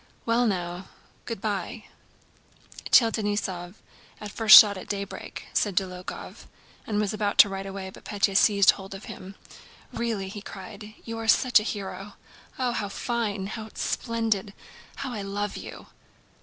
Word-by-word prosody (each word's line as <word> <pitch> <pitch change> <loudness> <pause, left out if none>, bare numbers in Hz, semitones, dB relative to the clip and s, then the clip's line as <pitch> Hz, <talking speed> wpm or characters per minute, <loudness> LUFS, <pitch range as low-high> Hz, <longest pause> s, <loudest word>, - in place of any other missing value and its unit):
"Well 235 +1 +2
now, 180 -2 -3 0.4
good 230 -4 -5
by. 210 +1 -3 1.1
Tell 230 -3 +6
Denísov, 205 -4 -3 0.4
'at 210 -1 -7
the - - -19
first 225 -2 +10
shot 205 -2 +5
at 185 - -9
daybreak,'" 200 -1 -6
said 205 -3 +1
Dólokhov 185 -2 -4 0.4
and 210 -1 0
was 210 -1 0
about 205 -1 -1
to 205 - +8
ride 195 0 -5
away, 195 -1 -6
but - - -15
Pétya 200 -1 0
seized 200 -1 +6
hold 195 0 -9
of 195 - -10
him. 190 +1 -9 0.6
"Really!" 225 -5 -2
he 205 +2 -7
cried, 210 +2 -10
"you 230 -1 -5
are 225 - -5
such 245 0 +5
a 215 - -3
hero! 195 0 -6 0.4
Oh, 255 -2 0
how 210 -4 -3
fine, 210 -3 -2
how 215 +2 -6
splendid! 225 -4 -1 0.4
How 265 -2 -5
I 210 - -4
love 200 +1 -3
you!" - - -9
205 Hz, 155 wpm, -26 LUFS, 195-220 Hz, 1.1 s, first